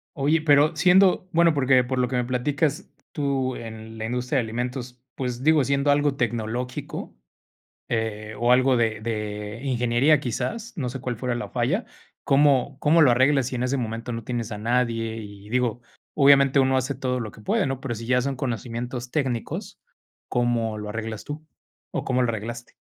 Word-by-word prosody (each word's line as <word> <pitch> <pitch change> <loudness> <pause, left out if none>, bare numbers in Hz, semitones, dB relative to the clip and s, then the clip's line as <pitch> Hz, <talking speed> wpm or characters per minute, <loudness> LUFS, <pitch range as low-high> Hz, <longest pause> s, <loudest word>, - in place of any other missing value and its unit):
Oye, 150 +2 +2
pero 150 +1 +4
siendo 185 +3 +4
bueno, 170 -1 +4
porque 130 -3 +4
por 130 +1 -2
lo 125 - +2
que 125 - -3
me 125 -1 +1
platicas 140 +4 -1 0.2
tú 135 -3 -1
en 110 0 -9
la 110 - -4
industria 125 +4 -1
de 125 - +2
alimentos, 125 +2 -5
pues, 125 -1 -4
digo, 155 -2 +4
siendo 140 +2 +2
algo 145 -1 +2
tecnológico, 120 +1 -3 0.7
eh, 110 -2 -3
o 120 +2 +3
algo 130 +1 +4
de 110 -2 0
de 105 -1 -4
ingeniería 130 +3 +2
quizás, 215 - -3
no 135 -7 -2
sé 130 +2 -6
cuál 125 -2 -3
fuera 125 +2 -2
la 120 - -4
falla. 130 - 0 0.4
¿Cómo 140 -1 +3
cómo 160 +2 +5
lo 140 - +6
arreglas 130 +2 +3
si 130 - -4
en 120 - -2
ese 130 +2 0
momento 115 -1 -4
no 115 -1 -5
tienes 120 -2 -3
a 105 - -5
nadie? 115 0 0
Y 100 -2 -10
digo, 120 -1 0 0.3
obviamente 140 -1 +5
uno 130 0 +3
hace 130 +2 -1
todo 125 -1 -2
lo 110 -3 -4
que - - -15
puede, 105 - +1
¿no? 135 -1 -3
Pero 130 -3 -3
si 115 +1 -7
ya 125 0 +3
son 135 +1 -2
conocimientos 120 0 -4
técnicos, 130 -6 -3 0.5
¿cómo 120 -3 0
lo 105 0 -6
arreglas 110 0 -5
tú? 155 +2 -7 0.5
¿O - - -2
cómo 130 -1 +1
lo 125 - +1
arreglaste? 115 +2 -6
125 Hz, 185 wpm, -24 LUFS, 115-140 Hz, 0.7 s, lo